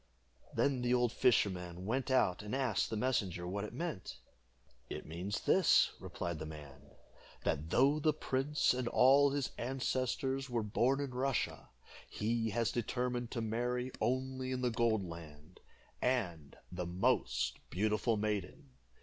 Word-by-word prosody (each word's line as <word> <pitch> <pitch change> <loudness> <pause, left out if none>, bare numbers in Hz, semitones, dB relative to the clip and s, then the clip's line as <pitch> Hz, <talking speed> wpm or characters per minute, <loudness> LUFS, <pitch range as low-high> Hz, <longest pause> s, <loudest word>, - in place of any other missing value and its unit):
Then 135 -3 +2
the 125 0 +2
old 120 -2 +2
fisherman 95 -8 +1
went 130 +6 -1
out 115 -9 +3
and 105 +4 -4
asked 130 -6 +1
the 110 - -2
messenger 100 -8 0
what 100 +3 -3
it 105 - -5
meant. 135 - -5 0.7
"It - - -6
means 90 +6 -4
this," - - +5
replied 85 -3 -4
the 80 - -5
man, 75 -2 -11 0.5
"that 75 +3 -1
though 140 - +4
the 155 +1 +3
prince 145 -1 +1
and 125 -1 -2
all 140 +4 +6
his 140 -1 -1
ancestors 130 +1 -1
were 120 -2 0
born 125 +6 +1
in 140 -2 -3
Russia, 130 - -1 0.4
he 115 +1 -1
has 115 +2 0
determined 125 0 -2
to 120 - -3
marry 120 +3 -1
only 130 +1 -1
in 130 0 -2
the 125 -1 +1
Gold 110 -3 +1
Land, 80 0 -11 0.4
and 90 - -1
the 90 -1 -4
most 65 -8 +1
beautiful 110 +3 +1
maiden. 105 -9 -3
115 Hz, 145 wpm, -34 LUFS, 90-130 Hz, 0.7 s, all